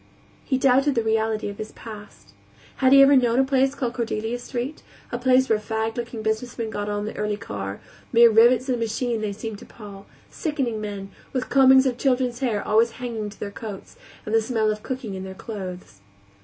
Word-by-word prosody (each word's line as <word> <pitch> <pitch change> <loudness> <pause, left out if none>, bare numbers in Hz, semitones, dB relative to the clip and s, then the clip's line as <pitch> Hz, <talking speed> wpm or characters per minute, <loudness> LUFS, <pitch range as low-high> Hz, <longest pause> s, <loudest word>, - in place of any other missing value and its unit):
He 265 - 0
doubted 270 +1 +3
the 230 - +1
reality 220 -1 0
of 200 0 -7
his 215 - -6
past. 205 - -12 0.4
Had 260 -1 +3
he 275 0 +9
ever 280 +1 +6
known 245 -2 +3
a 265 - +5
place 270 0 +1
called 245 -4 -2
Cordelia 230 -1 -2
Street, 250 +4 -5 0.3
a 240 - -3
place 260 +1 +4
where 220 -1 +2
fagged 220 +1 -3
looking 235 -2 -5
businessmen 220 +1 -2
got 205 -1 -3
on 205 0 -2
the 215 - -6
early 210 0 -2
car; 100 - -6 0.3
mere 235 -1 +7
rivets 240 +4 +5
in 260 - +1
a - - -1
machine 230 0 -1
they 210 -1 -2
seemed 215 0 -6
to 245 - -12
Paul, 200 -3 -12 0.2
sickening 270 - -2
men, 200 -2 -6 0.2
with 255 -1 -2
combings 265 -1 +6
of 250 -2 -1
children's 250 -2 +1
hair 230 -6 -1
always 225 +2 +3
hanging 230 -4 -5
to 205 - -15
their 200 - -5
coats, 205 -2 -8 0.3
and 215 - -4
the 225 - +4
smell 220 -2 0
of 210 0 -5
cooking 255 -5 -5
in 190 0 -5
their 190 0 -8
clothes. 185 - -8
225 Hz, 205 wpm, -24 LUFS, 210-255 Hz, 0.4 s, he